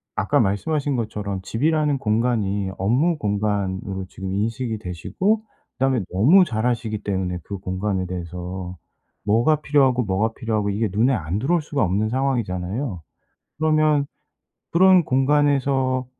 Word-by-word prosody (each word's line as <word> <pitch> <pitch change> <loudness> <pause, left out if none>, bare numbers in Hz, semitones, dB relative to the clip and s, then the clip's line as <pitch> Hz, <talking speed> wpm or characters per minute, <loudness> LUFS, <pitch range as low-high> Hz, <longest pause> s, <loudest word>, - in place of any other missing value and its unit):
아까 - - +1
말씀하신 140 +8 0
것처럼 105 -4 -3
집이라는 150 +6 +1
공간이 105 -5 0
업무 130 - +1
공간으로 100 -4 -2
지금 95 0 -6
인식이 110 +2 -2
되시고 185 - -1 0.3
그다음에 130 -2 +1
너무 145 - +5
잘 110 -5 -2
아시기 115 -3 -1
때문에 95 -3 -2
그 100 - -6
공간에 95 0 -2
대해서 90 +1 -6 0.5
뭐가 120 +9 +3
필요하고, 135 -4 +3
뭐가 105 +2 0
필요하고 110 -3 -1
이게 110 +3 0
눈에 115 +7 +2
안 90 -3 -2
들어올 165 +8 +1
수가 145 -2 -1
없는 100 +4 0
상황이잖아요. 115 - -2 0.6
그러면 155 -2 +2 0.7
그런 185 +1 +6
공간에서 135 -2 +2
110 Hz, 330 characters per minute, -22 LUFS, 95-140 Hz, 0.7 s, 그런